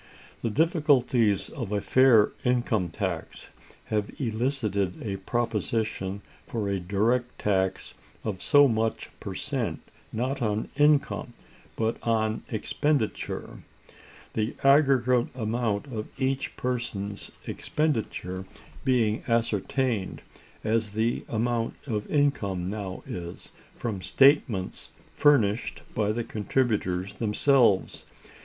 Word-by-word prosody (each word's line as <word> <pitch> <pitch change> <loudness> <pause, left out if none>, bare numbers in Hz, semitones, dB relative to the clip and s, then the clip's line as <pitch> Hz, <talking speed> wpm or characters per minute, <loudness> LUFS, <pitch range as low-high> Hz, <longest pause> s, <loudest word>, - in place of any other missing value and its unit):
The 115 - 0
difficulties 135 - +2
of 120 -9 -5
a 105 - +1
fair 120 -1 +5
income 120 -7 +1
tax 90 -1 -4 0.4
have 105 -1 +1
elicited 110 -6 0
a 100 -4 -3
proposition 110 -2 -2 0.2
for 110 -3 -2
a 100 -1 0
direct 110 +7 0
tax 95 -2 0 0.3
of 100 -4 -3
so 145 0 +6
much 110 -2 -1
per - - -6
cent, - - -2 0.3
not 130 +4 -2
on 110 -1 -1
income 145 -4 +2 0.4
but 115 0 -1
on 110 -1 0
expenditure; 130 +2 -1 0.7
the 110 +2 -1
aggregate 135 -3 +4
amount 110 -2 -1
of 115 -6 -5
each 135 0 -1
person's 105 -5 -3 0.2
expenditure 110 - -2 0.4
being 115 -5 +2
ascertained 115 -1 0 0.4
as 110 -1 0
the 110 +2 0
amount 115 0 0
of 105 -6 -3
income 100 -12 +1
now 100 -2 -5
is, 85 -1 -7 0.2
from 110 -6 -4
statements 130 -4 +3 0.2
furnished 115 -7 +2
by 105 -1 +1
the 120 +2 -2
contributors 105 -5 -1
themselves. 115 0 +2
115 Hz, 105 wpm, -27 LUFS, 100-125 Hz, 0.7 s, so